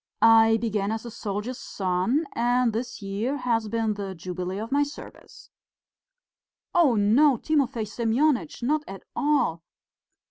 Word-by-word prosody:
I 225 0 +6
began 215 -3 -1
as 225 +1 -4
a 235 - -7
soldier's 215 +3 -4
son, 190 - -1
and 245 0 +1
this 230 -1 -5
year 210 +8 -2
has 235 -4 0
been 225 0 0
the 200 -2 -6
jubilee 180 +2 -5
of 220 +4 -5
my 285 +1 +3
service." 290 +1 -8 1.2
"Oh, 315 -9 +4
no, 235 +7 +4
Timofey 270 -5 0
Semyonitch, 235 - 0
not 300 +4 +1
at 195 0 -9
all. 285 - +1
225 Hz, 135 wpm, -25 LUFS, 205-255 Hz, 1.2 s, I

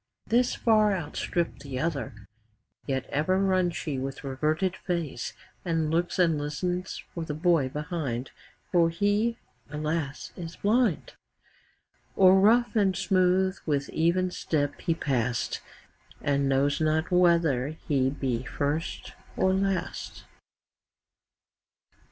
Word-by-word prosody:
5 - - -24
This 245 +1 +3
far 215 -3 +3
outstripp'd 170 0 -3
the 135 -2 -5
other; 135 -10 -3 0.6
Yet 135 -2 -1
ever 155 +6 +1
runs 185 -3 +2
she 145 -5 -3
with 135 +2 -5
reverted 155 +7 0
face, 170 -8 -3 0.3
And 165 -3 0
looks 170 +2 0
and 165 -4 +3
listens 180 +5 -3
for 170 - -4
the 150 -2 -4
boy 160 -4 +2
behind: 150 -5 -4 0.4
For 170 -2 +4
he, 205 +6 +1 0.3
alas! 150 -1 -3
is 170 -1 -7
blind! 215 - +1 1.0
O'er 185 -1 +7
rough 235 +5 +4
and 195 -4 +2
smooth 185 0 +2
with 140 -2 0
even 180 +3 +1
step 145 -4 -2
he 165 - 0
pass'd, 125 -5 -1 0.6
10 145 - +1
And 140 0 +1
knows 140 +3 +2
not 155 +2 +1
whether 170 -7 +3
he 140 -3 0
be 130 -4 -2
first 145 +5 -3 0.2
or 190 0 +3
last. 190 -2 -2
165 Hz, 120 wpm, -27 LUFS, 145-185 Hz, 1.0 s, O'er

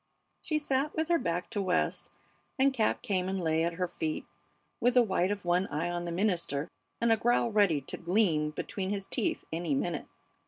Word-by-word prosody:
She 310 - 0
sat 290 0 0
with 320 +1 -1
her 340 - +4
back 175 -4 -2
to 205 -3 -1
West, 180 -2 0 0.5
and 270 0 +4
Cap 225 -4 +1
came 185 -2 0
and 190 0 -1
lay 160 -2 +1
at 170 0 0
her 180 +1 -1
feet 160 -3 -3 0.5
with 245 +1 +2
the 250 - +7
white 190 -3 +1
of 200 -3 -3
one 175 +2 +2
eye 160 +4 -2
on 175 0 -3
the 170 - -3
minister 170 -6 0 0.3
and 235 0 +3
a 225 - +5
growl 235 +1 +2
ready 200 -9 +3
to 130 - -6
gleam 170 -4 +2
between 185 +5 -4
his 200 -1 -2
teeth - - -1
any 165 -3 0
minute. 155 +2 -2
185 Hz, 200 wpm, -30 LUFS, 170-225 Hz, 0.5 s, the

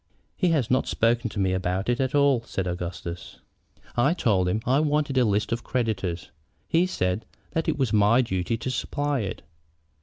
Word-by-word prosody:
"He 185 - +1
has 150 -9 +1
not 130 - +2
spoken 115 +1 +1
to 105 - -6
me 95 -1 +2
about 95 +1 -1
it 120 +1 +1
at 130 +1 0
all," 140 -4 +4
said 95 -4 -4
Augustus. 85 -1 -5 0.6
"I 135 +8 +3
told 95 - +2
him 110 +4 0
I 130 +3 +3
wanted 150 -2 +1
a - - +5
list 105 0 0
of 115 - 0
the - - -22
creditors. 100 -8 -2 0.4
He 170 +3 +3
said 90 - -1 0.3
that 160 - -1
it - - 0
was 130 -6 0
my 105 +4 +5
duty 95 0 -1
to 130 +3 -3
supply 145 +2 -1
it. 100 -4 -4
115 Hz, 190 wpm, -25 LUFS, 95-135 Hz, 0.6 s, a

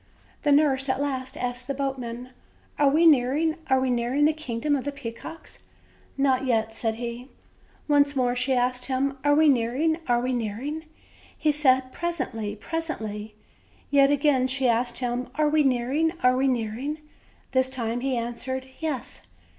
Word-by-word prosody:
The 295 - +2
nurse 280 -2 +3
at 260 0 +1
last 265 -2 -3
asked 250 0 -3
the 275 - -2
boatman: 255 -3 -4 0.5
"Are 285 -1 +5
we 315 +4 +3
nearing, 305 +2 +4
are 265 0 +4
we 260 -1 0
nearing 245 +4 +1
the 310 - +4
kiugdom 290 -1 -1
of 265 - -2
the 285 - -3
peacocks?" 280 +4 -9 0.5
"Not 270 -1 +2
yet," 225 -2 +1
said 225 0 -2
he. 240 +2 -6 0.6
Once 285 -1 +3
more 250 -2 +1
she 255 +2 0
asked 250 0 +1
him: 270 +1 -1
"Are 290 0 +4
we 310 +1 +5
nearing, 275 +5 +2
are 240 -1 +3
we 255 +1 -1
nearing?" 250 +8 -3 0.5
He 305 - +2
said: 260 -3 +2
"Presently, 255 -12 -3
presently." 220 -7 -5 0.6
Yet 275 -1 +5
again 285 -2 +3
she 260 0 0
asked 235 +1 +1
him: 245 0 -2
"Are 305 0 +2
we 310 0 +3
nearing, 270 +5 +1
are 250 0 +5
we 265 +1 +2
nearing?" 250 +4 -2 0.5
This 260 0 +2
time 240 -2 -2
he 260 0 -1
answered: 250 +3 -4
"Yes." 300 -7 -4
260 Hz, 160 wpm, -25 LUFS, 245-285 Hz, 0.6 s, Are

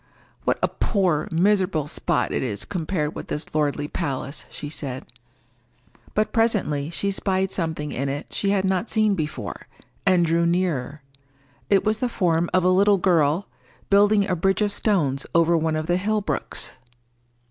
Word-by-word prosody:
"What - - +2
a - - +5
poor, 180 -8 0
miserable 185 -2 +2
spot - - 0
it - - -1
is 105 -6 -2
compared 160 -4 -2
with - - -7
this 150 - -5
lordly 145 -1 0
palace!" 140 0 -4
she 150 - -7
said. 135 -4 -5 1.1
But 215 0 +1
presently 190 -11 +1
she 200 +4 -1
spied 190 -1 0
something 160 -4 -2
in 135 +2 -2
it 145 +2 -5
she 200 - 0
had 195 -1 +2
not 190 +3 0
seen 215 -2 +3
before, 155 -4 -4 0.4
and 185 -3 +4
drew 170 +1 +2
nearer. 155 -5 -1 0.7
It 195 - +4
was 215 0 +1
the 250 - 0
form 175 -6 +1
of 185 - +2
a 180 - +4
little 200 +2 +4
girl, 170 -1 +2 0.4
building 205 0 +5
a 185 - +1
bridge 195 +4 +1
of 205 - +1
stones 160 - 0
over 170 0 +4
one 160 -1 +1
of 155 0 -2
the 175 +2 +1
hill 210 +3 0
brooks. - - -3
175 Hz, 165 wpm, -23 LUFS, 150-200 Hz, 1.1 s, a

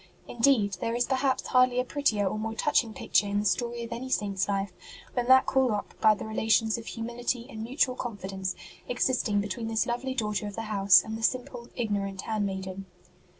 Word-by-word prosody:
Indeed, 230 -5 +2
there 230 - -1
is 245 0 +2
per 265 - 0
haps 260 -1 0
hardly 255 -1 +3
a - - +2
prettier 225 -8 +1
or 215 - -2
more 220 +1 -3
touching 245 -4 +1
picture 205 -1 +1
in 200 0 -1
the - - -5
story 235 +3 0
of 230 - -8
any 245 +3 -5
Saint 200 -5 -1
s 190 - +1
life 195 -1 -1 0.4
than 245 -1 -1
that 260 0 +7
called 265 -1 +2
up 210 -2 -3
by 215 -1 +6
the - - -7
relations 220 0 +2
of 230 -1 -7
humility 240 +1 -3
and 225 -5 -8
mutual 255 +3 +1
confidence 195 -6 -4 0.3
existing 245 -4 +1
between 210 +3 -4
this 225 0 +1
lovely 255 +2 -3
daughter 210 -3 -1
of 205 - -7
the 225 - -4
house 200 -3 +5
and 220 0 -5
the - - -8
simple, 245 0 -2
ignorant 200 -4 -2
hand 215 -2 -1
maiden. 190 0 -6
225 Hz, 205 wpm, -28 LUFS, 205-245 Hz, 0.4 s, that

